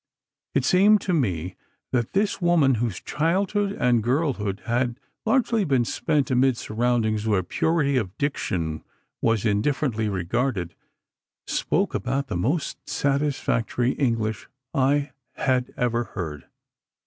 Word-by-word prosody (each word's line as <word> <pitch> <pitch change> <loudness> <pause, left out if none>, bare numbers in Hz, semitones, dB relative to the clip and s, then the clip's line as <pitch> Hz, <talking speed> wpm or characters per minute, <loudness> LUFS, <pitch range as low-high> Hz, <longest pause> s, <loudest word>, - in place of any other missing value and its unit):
It 135 -2 +2
seemed 200 +7 +5
to 185 - -1
me 95 - -1 0.4
that 120 -3 0
this 200 0 +1
woman, 160 -8 +4
whose 115 -7 -1
childhood 195 +5 0
and 125 - +2
girlhood 120 - -1
had 120 +1 0 0.3
largely 230 -2 +2
been 135 -8 +2
spent 145 0 0
amid 130 0 +3
surroundings 110 -2 0
where 100 -4 +2
purity 140 - +1
of 105 -5 -3
diction 85 - -2 0.4
was 115 -1 +1
indifferently 110 +1 +1
regarded, 95 0 -1 0.7
spoke - - 0
about 140 0 -2
the - - -2
most 140 - -2
satisfactory 135 -4 0
English 115 -6 -1 0.2
I 140 +2 +2 0.2
had 130 -1 0
ever 120 -1 +1
heard. 80 -9 -6
125 Hz, 120 wpm, -24 LUFS, 110-145 Hz, 0.7 s, seemed